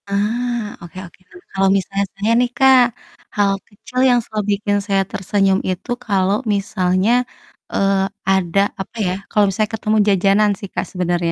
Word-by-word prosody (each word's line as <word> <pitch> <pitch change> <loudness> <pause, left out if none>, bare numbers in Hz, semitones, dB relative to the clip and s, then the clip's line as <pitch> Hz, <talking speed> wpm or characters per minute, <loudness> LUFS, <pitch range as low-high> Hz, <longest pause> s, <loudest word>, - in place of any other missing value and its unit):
Ah, 225 +2 -1
oke 170 +1 -12
oke, 170 - -17
heeh. 355 - -16
Kalau 195 0 +2
misalnya 195 +1 -2
saya 210 +3 0
nih, 245 0 +2
Kak, 265 -1 +6 0.6
hal 200 -1 +3 0.2
kecil 250 +5 -7
yang 245 -1 +4
selalu 215 -1 -3
bikin 205 0 0
saya 195 -2 +1
tersenyum 195 0 +1
itu 185 +6 -5 0.2
kalau 195 -2 +1 0.2
misalnya, 190 0 0 0.6
eee, 195 -1 +1 0.3
ada, 190 0 +2 0.2
apa 195 - -9
ya, 180 - 0 0.2
kalau 210 - +3
misalnya 210 +2 -1
ketemu 215 0 0
jajanan 200 +2 +3
sih, 200 - -8
Kak, - - -2
sebenernya. 175 -2 -1
200 Hz, 160 wpm, -19 LUFS, 190-215 Hz, 0.6 s, Kak